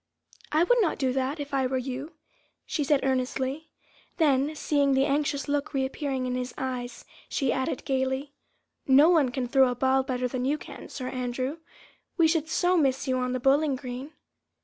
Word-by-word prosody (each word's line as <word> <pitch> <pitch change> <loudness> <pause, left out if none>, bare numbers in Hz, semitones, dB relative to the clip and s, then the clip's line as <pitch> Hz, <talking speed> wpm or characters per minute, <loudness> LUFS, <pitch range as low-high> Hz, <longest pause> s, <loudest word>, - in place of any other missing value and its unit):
"I 310 +2 +4
would - - +4
not 360 - +1
do 260 -3 0
that, 265 +3 -1
if 285 0 -6
I 265 -1 +2
were 260 +1 -1
you," 265 +5 -5 0.5
she 300 - -1
said 280 0 +2
earnestly; 265 +3 -1 0.5
then 295 -2 +2
seeing 285 -2 +2
the 265 +1 +3
anxious 285 0 0
look 285 0 0
once - - -15
more 270 - +2
reappearing 265 -1 -2
in 250 - -2
his 250 0 -4
eyes, 250 -2 -4 0.2
she 270 -4 0
added 260 0 -2
gaily; 265 +1 -1 0.5
"No 280 +5 +7
one 305 -7 +4
can 250 0 -3
throw 265 +1 +4
a 245 - -2
ball 265 +2 +2
better 255 -1 -2
than 250 0 -3
you 285 +4 +1
can, - - -10
Sir 255 -2 -6
Andrew, 255 +4 -3 0.6
we 330 -2 +5
should 320 -1 0
so 355 +2 +2
miss 275 -4 +1
you 255 -1 +1
on 250 0 -1
the 255 - -1
bowling 275 +2 +3
green." 255 +3 -7
270 Hz, 195 wpm, -27 LUFS, 255-290 Hz, 0.6 s, No